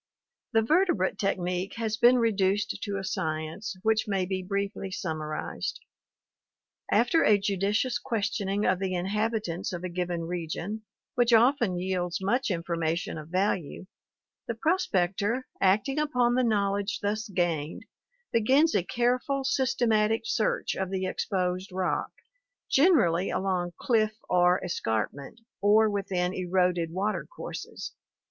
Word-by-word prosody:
The 225 0 +4
vertebrate 230 - +2
technique 180 -1 -1
has 225 -2 -1
been 240 +2 +5
reduced 205 -3 +1
to 200 -1 -3
a 195 - -4
science, 160 +4 -3
which 220 0 +2
may 195 -2 0
be 190 0 -2
briefly 200 +1 -3
summarized. 155 -4 -4 1.1
After 245 +8 +4
a 210 - +5
judicious 205 +5 0
questioning 205 -4 -1
of 185 0 +2
the 190 -1 -1
inhabitants 205 -1 -1
of 175 -1 -5
a 185 - -3
given 175 -1 -2
region, 175 +5 -4 0.3
which 245 -1 +2
often 235 -5 +4
yields 180 -1 -1
much 230 +8 0
information 170 -2 -2
of 155 +1 -10
value, 185 -2 -1 0.6
the 235 - -2
prospector, 225 - 0 0.2
acting 210 +9 +2
upon 250 -5 +2
the 255 +1 +2
knowledge 200 -2 0
thus 215 +2 -1
gained, 170 -5 -1 0.5
begins 265 +8 +4
a 200 - +3
careful, 250 +7 0
systematic 235 -5 +2
search 220 - 0
of 190 -1 -3
the 190 -1 -2
exposed 185 0 -2
rock, 185 0 -1 0.6
generally 230 - +4
along 180 -2 -1
cliff 220 -3 +1
or 180 0 +4
escarpment, 135 - -3 0.2
or 210 +1 +5
within 185 -3 -1
eroded 180 -2 +1
water 200 +5 -2
courses. - - -7
200 Hz, 125 wpm, -28 LUFS, 180-225 Hz, 1.1 s, been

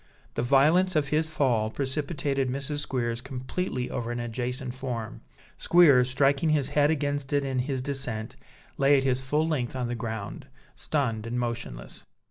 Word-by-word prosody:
The - - -1
violence 155 +9 +4
of 145 -3 +1
his 155 +2 +2
fall 125 -8 +1
precipitated 140 +1 -2
Mrs. 140 +3 -1
Squeers 120 -4 -2
completely 130 +1 -4
over 120 -1 -3
an 120 - -3
adjacent 125 +2 -3
form; 120 - -5 0.4
Squeers, 140 -8 +5
striking 140 +4 +2
his 150 -3 +2
head 145 0 +3
against 145 -3 -1
it 140 -1 +2
in 130 -1 -1
his 130 0 -2
descent, 125 -6 -3 0.4
lay 140 +1 +5
at 135 - +1
his 130 -1 +1
full 150 +4 0
length 135 -6 -1
on 125 -2 -2
the - - -2
ground, 110 -3 -5 0.3
stunned 115 -7 -2
and 120 +1 -2
motionless. 115 - -5
130 Hz, 160 wpm, -27 LUFS, 120-145 Hz, 0.4 s, Squeers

